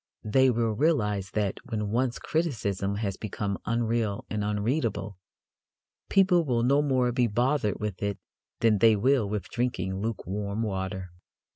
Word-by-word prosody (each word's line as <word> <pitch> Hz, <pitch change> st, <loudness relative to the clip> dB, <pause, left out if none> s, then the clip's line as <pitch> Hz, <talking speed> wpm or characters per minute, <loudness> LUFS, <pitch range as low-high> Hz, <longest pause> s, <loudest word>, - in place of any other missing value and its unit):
They 130 Hz, +5 st, +4 dB
will 115 Hz, -2 st, +1 dB
realize 105 Hz, -, +1 dB
that, 105 Hz, -2 st, -1 dB
when 105 Hz, -3 st, -2 dB
once 125 Hz, +1 st, 0 dB
criticism 100 Hz, -, -1 dB
has 100 Hz, -2 st, -2 dB
become 100 Hz, -2 st, -3 dB
unreal 115 Hz, -2 st, 0 dB
and 105 Hz, -1 st, -1 dB
unreadable, 105 Hz, -, -1 dB, 0.9 s
people 185 Hz, -3 st, +4 dB
will 120 Hz, -5 st, 0 dB
no 140 Hz, +4 st, +4 dB
more 130 Hz, -4 st, +2 dB
be 120 Hz, 0 st, +2 dB
bothered 120 Hz, -1 st, +1 dB
with 105 Hz, -4 st, -4 dB
it 100 Hz, -1 st, -1 dB, 0.4 s
than 110 Hz, -3 st, +4 dB
they 110 Hz, 0 st, +6 dB
will 120 Hz, 0 st, +2 dB
with 105 Hz, -1 st, -4 dB
drinking 95 Hz, -7 st, -2 dB
lukewarm 105 Hz, -1 st, -3 dB
water. 95 Hz, -3 st, -3 dB
110 Hz, 140 wpm, -27 LUFS, 100-125 Hz, 0.9 s, they